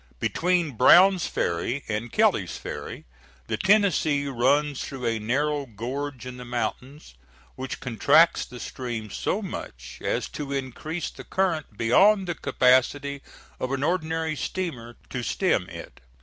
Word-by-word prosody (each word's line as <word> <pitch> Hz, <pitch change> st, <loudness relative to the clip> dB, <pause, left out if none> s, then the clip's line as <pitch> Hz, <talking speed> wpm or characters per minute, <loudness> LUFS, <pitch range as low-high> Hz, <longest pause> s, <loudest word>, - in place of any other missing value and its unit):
Between 175 Hz, -, +1 dB
Brown's 175 Hz, -, +6 dB
Ferry 100 Hz, +11 st, -2 dB
and 110 Hz, +2 st, -3 dB
Kelly's -, -, +2 dB
Ferry -, -, -7 dB, 0.4 s
the -, -, -2 dB
Tennessee 190 Hz, -8 st, +3 dB
runs 140 Hz, +2 st, +1 dB
through 135 Hz, -3 st, -6 dB
a 115 Hz, -1 st, 0 dB
narrow 140 Hz, +6 st, 0 dB
gorge 130 Hz, +4 st, -5 dB
in 125 Hz, 0 st, -7 dB
the 125 Hz, -, -8 dB
mountains, 125 Hz, -, -4 dB, 0.4 s
which 130 Hz, 0 st, -6 dB
contracts 135 Hz, +7 st, +4 dB
the 125 Hz, -, -10 dB
stream 115 Hz, -5 st, -5 dB
so 215 Hz, -, -2 dB
much 65 Hz, -, -8 dB
as -, -, -1 dB
to 145 Hz, -2 st, -6 dB
increase 140 Hz, +5 st, -4 dB
the -, -, -11 dB
current 165 Hz, -, -1 dB
beyond 195 Hz, -, +4 dB
the 175 Hz, -, -1 dB
capacity 140 Hz, 0 st, +2 dB, 0.4 s
of 130 Hz, -, -3 dB
an 135 Hz, 0 st, -1 dB
ordinary 160 Hz, -1 st, -1 dB
steamer 130 Hz, -11 st, -4 dB, 0.2 s
to 125 Hz, -, -3 dB
stem -, -, 0 dB
it. -, -, -10 dB
140 Hz, 135 wpm, -25 LUFS, 120-160 Hz, 0.4 s, Brown's